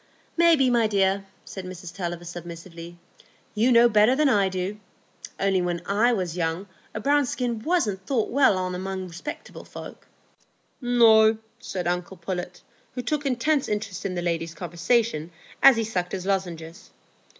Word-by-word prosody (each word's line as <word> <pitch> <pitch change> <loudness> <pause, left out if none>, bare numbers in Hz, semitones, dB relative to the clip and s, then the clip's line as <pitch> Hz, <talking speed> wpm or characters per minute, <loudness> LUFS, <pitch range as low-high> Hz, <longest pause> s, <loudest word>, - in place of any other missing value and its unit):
"Maybe, 325 -7 +4
my 235 -2 +3
dear," 195 -1 +1 0.2
said 190 - -8
Mrs 180 -1 -9
Tulliver, 175 -2 -4
submissively. 170 0 -9 0.6
"You 230 +4 +2
know 235 0 +7
better 215 +2 +4
than 300 0 +3
I 200 -5 +3
do. 190 +3 -4 0.6
Only 195 -1 +2
when 175 -1 -1
I 215 +5 +2
was 185 -7 -2
young 165 +2 -2 0.3
a - - -2
brown 285 +3 +2
skin 240 -2 -2
wasn't 215 - -1
thought 245 -6 0
well 265 -6 +4
on 185 0 -2
among 190 0 -4
respectable 175 - -8
folks." - - -11 0.7
"No," 225 -3 +5 0.2
said 185 -6 -5
uncle 180 +2 -2
Pullet, 180 0 -5 0.3
who 250 - -4
took 295 +2 -1
intense 275 +3 +1
interest 205 -3 -3
in 185 -2 -3
the 175 - -3
ladies' 165 -1 -2
conversation 175 0 0 0.3
as 275 -2 +8
he 225 - +1
sucked 185 -5 -3
his 185 -1 -4
lozenges. 175 -2 -3
195 Hz, 155 wpm, -25 LUFS, 175-235 Hz, 0.7 s, as